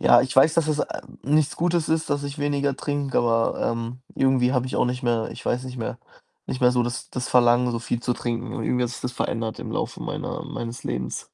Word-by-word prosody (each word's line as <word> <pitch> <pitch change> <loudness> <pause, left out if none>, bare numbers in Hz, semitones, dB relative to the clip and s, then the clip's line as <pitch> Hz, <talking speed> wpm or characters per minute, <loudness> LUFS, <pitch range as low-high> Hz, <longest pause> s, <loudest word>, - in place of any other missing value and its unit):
ja, 120 - +7
ich 130 - -2
weiß, 155 +4 +7
dass 165 -2 +3
es, 150 -1 +1
äh, - - -3 0.2
nichts 150 +1 +2
Gutes 170 -1 +1
ist, 160 -1 0
dass 145 0 0
ich 140 0 -5
weniger 145 -1 0
trinke, 145 -2 -2
aber, 115 -1 +2
ähm, 115 +2 -5 0.2
irgendwie 130 -1 +3
habe 125 -1 +1
ich - - -5
auch - - +3
nicht 125 +1 -2
mehr 115 -2 +1
ich - - -10
weiß 125 +1 +1
nicht 130 0 -7
mehr 120 +2 -4 0.5
nicht 130 - -4
mehr 125 0 +5
so 125 -1 +3
das 120 0 -4
das 125 0 -3
Verlangen, 120 0 +4
so 115 - -1
viel 115 0 -2
zu 125 - +1
trinken 120 0 -3
und - - -3
irgendwie 125 0 +1
hat 120 - -2
sich - - -7
das 125 - -3
verändert 115 -2 -2
im - - -6
Laufe - - -3
meiner - - -4
meines 115 0 -5
Lebens. 60 0 -3
125 Hz, 245 wpm, -24 LUFS, 120-140 Hz, 0.5 s, ja